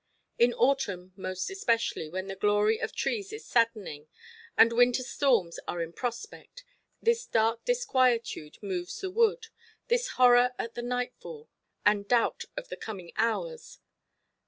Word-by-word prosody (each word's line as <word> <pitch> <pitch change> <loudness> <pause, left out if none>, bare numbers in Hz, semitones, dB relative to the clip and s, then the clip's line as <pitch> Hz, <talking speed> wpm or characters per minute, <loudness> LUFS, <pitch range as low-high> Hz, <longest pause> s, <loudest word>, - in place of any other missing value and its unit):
In 240 +1 +5
autumn 200 -9 0
most 185 - -4
especially, 230 - 0
when 185 +3 -4
the 195 0 -6
glory 210 +2 +2
of - - -2
trees 405 -3 -2
is 440 0 -8
saddening, 215 -11 0 0.5
and 230 +1 +6
winter 245 +2 +3
storms 240 - +1
are 175 - -3
in 165 0 -4
prospect, 345 - -6 0.4
this 465 +1 +1
dark 225 +1 +1
disquietude 255 - +1
moves 180 -3 -4
the 380 -1 -4
wood, 460 +3 +2 0.4
this 485 +1 +1
horror 250 0 +6
at 230 - -4
the 240 - -5
nightfall, 250 - -5 0.4
and 205 -1 +3
doubt 240 0 +1
of - - -6
the - - -6
coming 190 -6 -8
hours. 470 - -2
235 Hz, 140 wpm, -29 LUFS, -, 0.5 s, and